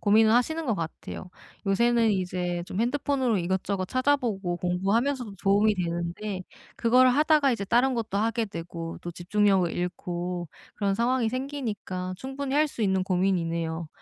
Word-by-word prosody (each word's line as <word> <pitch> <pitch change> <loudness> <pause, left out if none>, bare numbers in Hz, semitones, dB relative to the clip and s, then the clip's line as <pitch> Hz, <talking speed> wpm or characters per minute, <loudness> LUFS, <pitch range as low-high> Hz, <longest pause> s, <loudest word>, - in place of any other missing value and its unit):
고민을 220 +1 +5
하시는 315 +7 +2
것 230 - +1
같아요. 170 +1 -6 0.4
요새는 230 +3 +3
이제 180 -2 -2
좀 190 - -3
핸드폰으로 260 -1 +1
이것저것 185 +1 -1
찾아보고 240 -8 0
공부하면서도 205 +7 0
도움이 205 +2 +4
되는데 180 +2 -3 0.3
그걸 250 +2 +5
하다가 295 +1 +4
이제 225 -4 -2
다른 245 +6 +3
것도 225 -4 -2
하게 225 +2 +1
되고 165 -3 -6
또 175 - -5
집중력을 190 0 +2
잃고 175 0 -3 0.3
그런 200 -2 +1
상황이 240 +1 +1
생기니까 220 -9 -4
충분히 270 +5 -4
할 305 +1 +4
수 230 - -4
있는 190 -2 +2
고민이네요. 170 -3 0
205 Hz, 360 characters per minute, -27 LUFS, 180-245 Hz, 0.4 s, 고민을